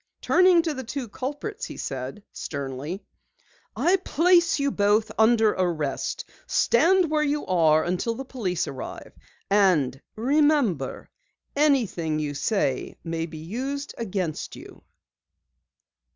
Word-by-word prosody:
Turning 365 -2 +5
to 320 -2 -1
the 260 -2 -5
two 255 +1 -5
culprits, 295 - -5
he - - -8
said 135 +8 -5
sternly: 140 +5 -5 0.7
"I 365 +3 +3
place 345 -1 +3
you 280 -1 0
both 210 +1 +2
under 220 -1 +4
arrest! 160 -7 -2 0.2
Stand 360 -2 +3
where 305 -1 +2
you 295 0 0
are 160 -3 +3
until 185 +6 -1
the 270 - -6
police 195 -10 -2
arrive, 130 - -7 0.3
and 170 -10 +3
remember, 265 - +1 0.4
anything 235 - +2
you 150 -1 -2
say 145 - -1
may 165 -1 -3
be 160 -1 -9
used 260 - -4
against 185 -8 -3
you." - - -13
215 Hz, 120 wpm, -25 LUFS, -, 0.7 s, Turning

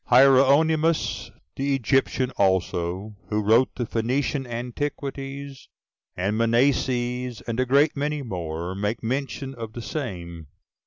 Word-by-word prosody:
Hieronymus 140 +5 +4 0.3
the 140 +1 +1
Egyptian 130 +1 +1
also, 95 0 0
who 105 0 0
wrote 115 +5 +4
the 120 - -2
Phoenician 130 +4 -1
Antiquities, 135 +2 -5 0.5
and 95 +4 0
Mnaseas, 125 0 +1
and 115 +1 -2
a 130 - +1
great 140 +4 +4
many 145 0 -2
more, 85 -4 -4
make 105 +4 -2
mention 135 +2 -3
of 115 -3 -7
the 120 - -6
same. 85 - -5
125 Hz, 115 wpm, -25 LUFS, 105-135 Hz, 0.5 s, Hieronymus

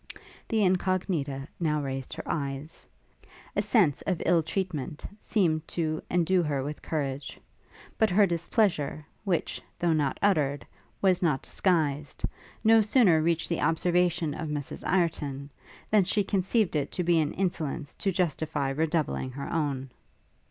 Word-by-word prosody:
The 220 -2 +2
Incognita 180 -7 0
now 155 -3 +1
raised 135 -2 -4
her - - -6
eyes. 140 +1 -4 0.7
A - - +3
sense 180 - +3
of 180 -4 0
ill 170 -1 +4
treatment 160 -4 -3
seemed 160 -8 +1
to 155 -2 0
endue 180 +1 +3
her 145 -5 -1
with 150 +2 -5
courage; 140 -3 -3 0.6
but 220 - +4
her 200 +3 +5
displeasure, 170 - 0 0.2
which, 180 -4 -1 0.2
though 170 -1 +2
not 145 -4 0
uttered, 150 -8 +1 0.4
was 185 -2 +4
not 150 -7 +1
disguised, 150 -6 0 0.4
no 225 0 +6
sooner 205 -7 +4
reached 165 0 +1
the 170 - -1
observation 175 -1 +2
of 160 -3 -4
Mrs 145 -2 -4
Ireton, 145 -6 0 0.4
than 210 -2 +5
she 205 +3 +1
conceived 195 0 +1
it 145 -2 -1
to 180 - -1
be 170 -1 +3
an 150 -2 0
insolence 160 -6 -2
to 195 - -1
justify 160 -5 -1
redoubling 155 -2 0
her 140 +4 -5
own. 140 -5 -1
160 Hz, 140 wpm, -28 LUFS, 145-185 Hz, 0.7 s, no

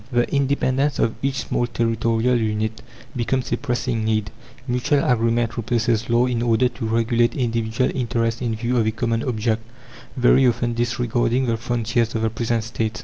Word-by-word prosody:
The 120 -1 +2
independence 140 0 +1
of 115 - +1
each 135 0 -1
small 120 - 0
territorial 115 +1 +1
unit 110 -1 -1 0.3
becomes 125 +2 -1
a - - +1
pressing 120 -3 -2
need; 110 -1 0 0.4
mutual 125 +3 +1
agreement 115 -1 +1
replaces 115 -1 0
law 120 +1 +3
in 125 -2 -1
order 120 +1 +3
to 115 -2 -6
regulate 115 +1 +1
individual 115 0 0
interests 115 -2 -1
in 115 -3 -1
view 120 +3 -1
of 110 -2 +2
a - - +2
common 115 0 -1
object 115 -2 -1 0.6
very 130 +1 +5
often 120 0 0
disregarding 120 +1 0
the 115 -2 +1
frontiers 115 0 -1
of 110 - -1
the 110 - +1
present 115 0 -1
States. 110 -1 -3
115 Hz, 165 wpm, -22 LUFS, 115-125 Hz, 0.6 s, very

